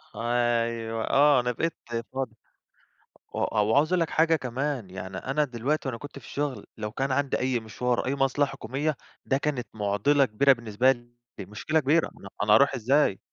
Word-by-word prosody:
أيوَه. 115 -1 0
آه، 145 -1 +5
أنا 125 0 0
بقيت 165 +7 -1 0.4
فاضي. 130 -4 -3 1.0
و - - -3
و 110 - 0
وعاوز 145 +10 +3
اقول 180 - +3
لك 165 - 0
حاجة 160 0 +3
كمان، 130 -4 -3
يعني 95 0 -7
أنا 145 +3 0
دلوقتي 135 +3 -2
وأنا 115 -3 -4
كنت 145 -1 -9
في - - -16
الشُغل، 145 -2 -3
لو 105 -1 -5
كان 135 0 -1
عندي 140 0 0
أي 125 -1 0
مشوار 120 +2 -2
أو - - -5
أي 135 - 0
مصلحة 135 0 +1
حكومية، 135 +4 -2 0.3
ده 135 - +2
كانت 140 -4 -2
مُعضلَة 105 +8 +2
كبيرة 135 +4 +4
بالنسبة 120 +2 +2
لي، 120 -1 -12 0.3
مشكلة 155 +10 -1
كبيرة. 150 +4 +2
ما - - -18
أنا 100 - -9
أنا 105 0 +3
هاروح 140 +5 +5
إزاي. 125 -3 +2
130 Hz, 185 wpm, -27 LUFS, 115-145 Hz, 1.0 s, آه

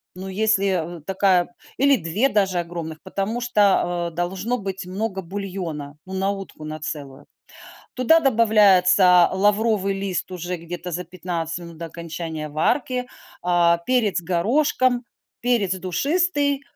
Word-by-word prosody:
ну, 185 +1 -7
если, 190 -4 0
э, - - -13
такая 190 +1 +2 0.2
или 280 +1 +5
2 195 +5 +1
даже 195 -7 +1
огромных, 170 -2 -5
потому 205 +4 -3
что, 200 -7 +2
а, - - -6
должно 185 +8 -2
быть 195 -3 -5
много 195 +1 -3
бульона, 175 -6 -5
ну, 190 - -7
на 190 +1 0
утку 195 -6 -8
на 155 0 -6
целую. 145 -3 -7 0.7
Туда 290 +6 +4
добавляется 200 - +5
лавровый 205 +1 +2
лист 190 -2 -3
уже 180 0 -4
где-то 175 +1 -7
за 175 +2 -2
15 170 -2 -4
минут 170 -1 -10
до 170 - -5
окончания 165 -1 -6
варки, 250 - 0 0.3
а, 175 -1 +3
перец 230 -8 +2
горошком, 245 - +1 0.4
перец 230 -6 +1
душистый, 285 - 0
190 Hz, 130 wpm, -22 LUFS, 170-220 Hz, 0.7 s, или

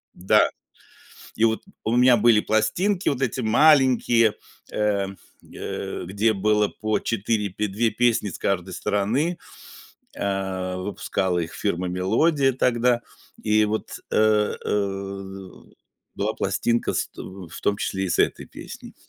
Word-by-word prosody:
Да, 90 - +3 0.9
и 110 - +2
вот 110 -1 +1 0.2
у 115 +2 +1
меня 125 0 +6
были 115 -1 +5
пластинки 180 - +1
вот 135 -2 -1
эти 130 0 -1
маленькие, 120 -3 +4 0.4
э, 105 -2 0 0.5
э, - - -5
где 100 +5 +1
было 105 +1 +2
по 110 +1 -2
4 105 -1 -1
пе 105 +3 -2
2 110 +4 0
песни 120 -1 +1
с - - -8
каждой 95 -1 -1
стороны. 125 - 0 0.8
Э, 95 -2 -2
выпускала 95 -1 -2
их 85 -1 -4
фирма 90 -3 -2
Мелодия 135 - +2
тогда, 120 -1 +2 0.4
и 110 0 +3
вот, 105 +1 -3
э, 110 -1 +3
э, 95 -1 -3 0.6
была - - -2
пластинка 115 0 0
с - - -1
тв - - -25 0.3
в - - -9
том 100 - +1
числе 95 0 -2
и - - -2
с - - 0
этой - - +1
песней. - - -10
105 Hz, 135 wpm, -24 LUFS, 95-120 Hz, 0.9 s, меня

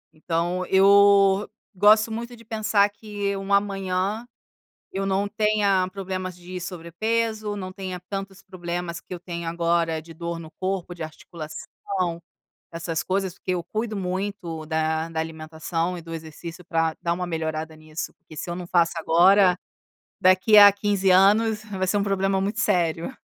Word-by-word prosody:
Então, 170 +3 -1
eu 200 0 +5 0.2
gosto 215 +3 +5
muito 235 +2 -5
de 230 -1 -17
pensar 215 -2 +2
que 205 -1 -4
um 195 0 -5
amanhã 200 +2 0 0.6
eu 195 0 -3
não 195 +1 +1
tenha 210 -3 +2
problemas 185 -1 -4
de 180 +1 -8
sobrepeso, 210 +5 -2
não 185 -1 -6
tenha 185 -2 -5
tantos 195 -1 -5
problemas 175 -2 -5
que - - -9
eu 175 - -6
tenho 170 -1 -5
agora, 170 -1 0
de 165 +1 -13
dor 170 0 -5
no 160 -1 -9
corpo, 185 -2 -3
de 165 - -6
articulação, 170 +3 -5 0.5
essas 165 -1 -3
coisas, 190 -1 -1
porque 185 - -5
eu 175 -2 -2
cuido 215 +4 -3
muito 185 -4 -4
da 160 0 0
da 160 -1 -2
alimentação 160 +2 -3
e - - -8
do 165 0 -9
exercício, 165 +2 -8
pra 165 -2 0
dar 170 0 +1
uma 180 +1 -3
melhorada 160 -1 -3
nisso, 155 0 -7
porque 165 -3 -16
se 175 - -5
eu 175 - -3
não 180 -1 -6
faço 170 -2 +3
agora 180 +3 +5 0.6
daqui 185 +4 +5
a 205 0 +10
15 200 -1 0
anos 210 +4 +4
vai 190 -3 -3
ser 205 - +2
um 200 - +1
problema 195 -1 +1
muito 205 +3 -2
sério. 175 +2 0
185 Hz, 160 wpm, -24 LUFS, 170-200 Hz, 0.6 s, a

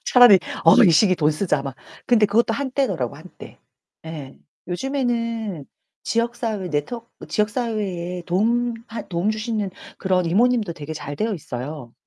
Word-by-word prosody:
차라리 245 -6 +8 0.3
"어 165 - +8
이 175 - +6
시기에 185 +4 +5
돈 150 -1 +3
쓰자, 150 -3 0
막." 135 -2 -5 0.3
근데 220 -4 +5
그것도 225 +2 +2
한때더라고요, 275 0 -1
한때. - - -13 1.1
요즘에는 230 - -2 0.4
지역 235 +1 0
사회 210 -6 -3
네트워크 230 +11 -3 0.2
지역 210 -1 +1
사회에 195 -7 -3
도움 230 +6 +1
하 230 - -5
도움 180 +4 0
주시는 215 -2 -2 0.3
그런 185 -2 +1
이모님도 220 +1 +2
되게 155 -1 -7
잘 145 -2 -6
되어 220 -1 -1
있어요. 130 -3 -7
210 Hz, 320 characters per minute, -22 LUFS, 170-230 Hz, 1.1 s, 차라리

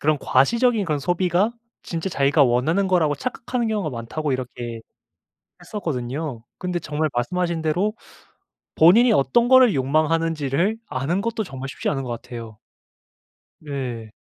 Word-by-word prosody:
그런 150 0 +2
"과시적인 225 - +2
그런 155 -3 -1
소비가 180 +7 +1 0.3
진짜 170 +2 -4
자기가 140 -2 +3
원하는 145 +11 +2
거라고 165 -5 +2
착각하는 240 - -3
경우가 205 -8 -1
많다."고 130 +5 -3
이렇게 120 -2 -5 0.8
했었거든요. 140 - -4
근데 180 -1 -2
정말 155 -1 -2
말씀하신 170 +6 -1
대로 180 +7 0 0.8
본인이 220 +9 +6
어떤 235 - +3
거를 260 - +6
욕망하는 155 +4 +1
지를 155 +10 0
아는 140 +9 -1
것도 230 +1 -2
정말 135 -4 -7
쉽지 - - -4
않은 135 -2 -1
것 125 - -6
같아요. 115 -2 -8 1.0
네. 125 -7 -5
155 Hz, 330 characters per minute, -22 LUFS, 130-185 Hz, 1.0 s, 본인이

